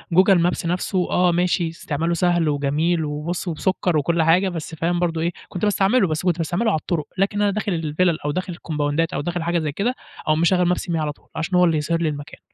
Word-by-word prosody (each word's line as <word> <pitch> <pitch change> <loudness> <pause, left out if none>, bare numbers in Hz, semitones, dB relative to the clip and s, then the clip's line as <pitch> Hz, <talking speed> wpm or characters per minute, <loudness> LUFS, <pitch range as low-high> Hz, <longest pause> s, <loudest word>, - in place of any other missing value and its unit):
google 190 +1 +6
maps 175 -1 0
نَفْسه 180 +1 -1
آه 180 -1 +3
ماشي 175 -1 +1
استعماله 165 +1 -2
سهل 175 -2 +2
وجميل 150 +4 0
وبُص 155 +5 -4
وبسكر 175 0 0
وكُلّ 165 +3 +1
حاجة، 180 +4 +4
بس 165 -1 -6
فاهم 170 +2 0
برضه 165 -2 0
إيه 170 +1 0 0.2
كنت 180 - -6
باستعمله 205 +1 +3
بس 155 +2 -2
كنت 175 -2 +1
باستعمله 180 +7 0
على 155 - +1
الطُرق، 155 -3 -2
لكن 200 +2 +1
أنا 205 -1 +3
داخل 200 -2 -2
الفلل 160 +1 0
أو 145 - +1
داخل 185 +2 -3
الكومباوندات 155 0 -1
أو - - -1
داخل 175 +1 -3
حاجة 170 0 +1
زي 155 -2 -2
كده 235 - -1 0.3
أقوم 155 +1 +2
مشغّل 180 0 +3
maps - - -5
me - - 0
على 155 -2 -1
طُول - - -19
عشان 160 +3 -2
هو 180 - +6
اللي 165 -2 +2
يظهر 165 +3 -1
لي 160 - +1
المكان 145 -1 -7
170 Hz, 225 wpm, -22 LUFS, 155-180 Hz, 0.3 s, google